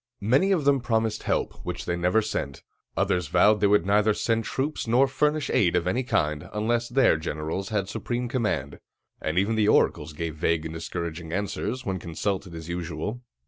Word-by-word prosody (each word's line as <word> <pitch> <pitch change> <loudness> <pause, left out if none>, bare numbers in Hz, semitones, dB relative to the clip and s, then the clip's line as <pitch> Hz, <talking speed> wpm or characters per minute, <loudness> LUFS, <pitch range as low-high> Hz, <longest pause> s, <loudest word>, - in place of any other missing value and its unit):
Many 135 - +3
of 170 -7 +1
them 140 -2 +4
promised 110 -2 0
help, - - -2
which - - -5
they 85 - -1
never 90 +6 +2
sent; 70 -10 -4 0.3
others 90 -3 +1
vowed 105 +8 +4
they 105 - +4
would 100 -3 +3
neither 105 +2 +3
send 115 -1 0
troops 140 -1 -2
nor 125 +4 +4
furnish 150 +2 0
aid 90 -4 +3
of 90 -1 +1
any 105 +8 +1
kind, 80 - -1
unless 115 +3 0
their 130 - +4
generals 80 +4 -4
had 100 -3 -1
supreme 120 +4 -3
command; 120 -3 -2 0.4
and 80 +2 -2
even 100 +4 +2
the 110 -2 +2
oracles 75 -6 +2
gave 80 +1 -4
vague 80 0 0
and 80 - -5
discouraging 80 0 -5
answers, 100 +7 -3
when 95 -2 -2
consulted 90 +2 -3
as 80 0 -8
usual. 85 +6 -4
105 Hz, 185 wpm, -26 LUFS, 85-120 Hz, 0.4 s, them